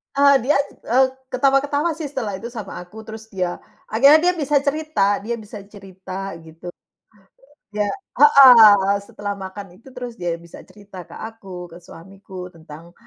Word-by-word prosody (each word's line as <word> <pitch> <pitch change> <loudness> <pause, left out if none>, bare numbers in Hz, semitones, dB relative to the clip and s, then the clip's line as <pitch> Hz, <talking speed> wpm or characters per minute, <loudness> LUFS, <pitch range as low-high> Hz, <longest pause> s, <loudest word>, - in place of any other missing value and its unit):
Eee, 280 -1 +5
diaj 280 +1 +2 0.2
e 240 - +1 0.3
ketawa-ketawa 280 +5 +1
sih 315 -1 -6
setelah 220 -9 -5
itu 235 - -7
sama 225 -5 -8
aku, 205 +5 -11
terus 220 0 -10
dia 180 -4 -4 0.3
akhirnya 295 +10 +5
dia - - -7
bisa 295 +1 -1
cerita 285 -9 0
dia 235 +3 -4
bisa 210 -1 -10
cerita, 195 -1 -9
gitu. 165 +2 -11 1.0
Ya 210 -1 -1 0.3
heeh, 225 -9 +7
setelah 205 0 -6
makan 195 0 -9
itu - - -20
terus 245 -2 -7
dia 175 -5 -4
bisa 170 0 -14
cerita 195 -1 -13
ke - - -12
aku, 195 -5 -9
ke 170 - -11
suamiku, 185 +2 -11
tentang 165 +1 -14
210 Hz, 150 wpm, -20 LUFS, 190-265 Hz, 1.0 s, heeh